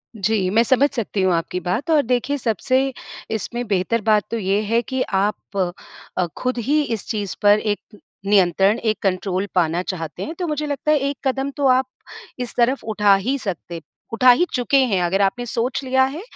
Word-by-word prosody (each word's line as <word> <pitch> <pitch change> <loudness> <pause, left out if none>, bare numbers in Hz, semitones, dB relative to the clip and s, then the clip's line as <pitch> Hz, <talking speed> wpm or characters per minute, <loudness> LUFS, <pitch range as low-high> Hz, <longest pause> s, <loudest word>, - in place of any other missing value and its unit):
जी, 200 -2 0
मैं 220 +4 +4
समझ 265 +4 +3
सकती 215 -5 -2
हूँ 185 -2 +3
आपकी 170 +2 -2
बात 215 - -3
और 305 -2 +5
देखिए, 250 +4 0
सबसे 255 +4 0 0.4
इसमें 240 +2 -3
बेहतर 205 +3 0
बात 210 -1 +3
तो 230 - -1
ये 200 0 0
है 230 +3 +1
कि 260 +3 -3 0.2
आप 205 0 -3 0.6
अ, 180 - +2
खुद 255 0 -2
ही 285 +6 +1
इस 225 -6 -4
चीज़ 205 -4 -3
पर 205 +1 +5
एक 210 0 -4 0.3
नियंत्रण, 195 +2 +3
एक 220 -2 0
कंट्रोल 190 0 -1
पाना 170 0 +2
चाहते 165 -5 -5
हैं, 320 - -5
तो 355 - -1
मुझे 300 -1 -2
लगता 290 +1 -1
है, 305 - +4
एक 280 0 -2
कदम 270 +1 -1
तो 285 -1 +2
आप 260 +1 +4 0.5
इस 245 -1 -5
तरफ 250 +3 +2
उठा 210 -2 +3
ही 250 +8 -1
सकते 175 -4 -5 0.3
उठा 250 +2 +5
ही 265 +9 +3
चुके 255 +2 +2
हैं। 230 -9 +2
अगर 190 +3 +1
आपने 245 +5 0
सोच 245 +4 -2
लिया 265 0 +3
है, 275 +6 -2
225 Hz, 195 wpm, -21 LUFS, 195-260 Hz, 0.6 s, और